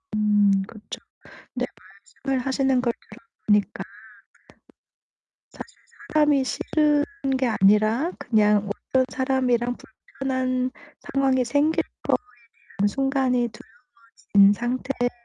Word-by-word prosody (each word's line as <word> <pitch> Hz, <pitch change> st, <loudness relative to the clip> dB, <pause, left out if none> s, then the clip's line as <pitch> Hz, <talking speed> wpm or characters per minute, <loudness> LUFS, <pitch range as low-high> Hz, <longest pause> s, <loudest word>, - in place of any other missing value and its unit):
음 210 Hz, -1 st, +3 dB, 0.2 s
그렇죠. 215 Hz, -2 st, -10 dB, 0.5 s
네 -, -, -2 dB, 0.6 s
말씀을 265 Hz, -2 st, -1 dB
하시는 265 Hz, -1 st, +1 dB
걸 240 Hz, -2 st, 0 dB
들어 -, -, -20 dB, 0.3 s
보니까 205 Hz, -2 st, +1 dB, 1.7 s
사실 -, -, -11 dB, 0.4 s
사람이 295 Hz, -3 st, +3 dB
싫은 295 Hz, +2 st, +1 dB, 0.3 s
게 260 Hz, -, +1 dB
아니라 215 Hz, -, +3 dB
그냥 210 Hz, -2 st, +2 dB, 0.2 s
어떤 260 Hz, -1 st, +3 dB
사람이랑 255 Hz, -2 st, 0 dB
불편한 255 Hz, +1 st, -3 dB, 0.3 s
상황이 265 Hz, -2 st, +1 dB
생길 290 Hz, +6 st, +1 dB, 0.2 s
거에 -, -, +2 dB, 0.6 s
대한 205 Hz, +1 st, +3 dB
순간이 265 Hz, -1 st, 0 dB, 0.7 s
두려워진 200 Hz, -1 st, +4 dB
상태라고 245 Hz, +2 st, -2 dB
255 Hz, 230 characters per minute, -24 LUFS, 215-270 Hz, 1.7 s, 두려워진